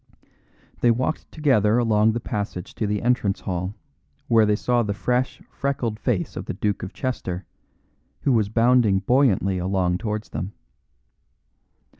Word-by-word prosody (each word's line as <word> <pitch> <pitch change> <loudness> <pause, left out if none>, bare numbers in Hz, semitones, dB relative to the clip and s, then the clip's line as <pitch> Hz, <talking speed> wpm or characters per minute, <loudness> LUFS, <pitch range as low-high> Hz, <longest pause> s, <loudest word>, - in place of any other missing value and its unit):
They 120 - +4
walked 130 +7 -1
together 120 -8 +3
along 110 -2 +3
the 120 - -1
passage 105 -6 -4
to 110 - -2
the 105 0 -1
entrance 120 -5 +1
hall, 90 +2 -3 0.5
where 115 -2 +5
they 105 - +3
saw 120 +3 +1
the 100 -3 -2
fresh, 125 +4 -1
freckled 125 -6 -2
face - - -1
of - - -5
the - - -4
Duke 105 -1 -1
of 95 - -5
Chester, 95 -9 -4 0.8
who 140 - +2
was 110 -4 +2
bounding 115 -2 +4
buoyantly 100 -5 +2
along 90 -1 0
towards 110 -1 -3
them. 90 +7 -5
110 Hz, 145 wpm, -24 LUFS, 100-125 Hz, 0.8 s, where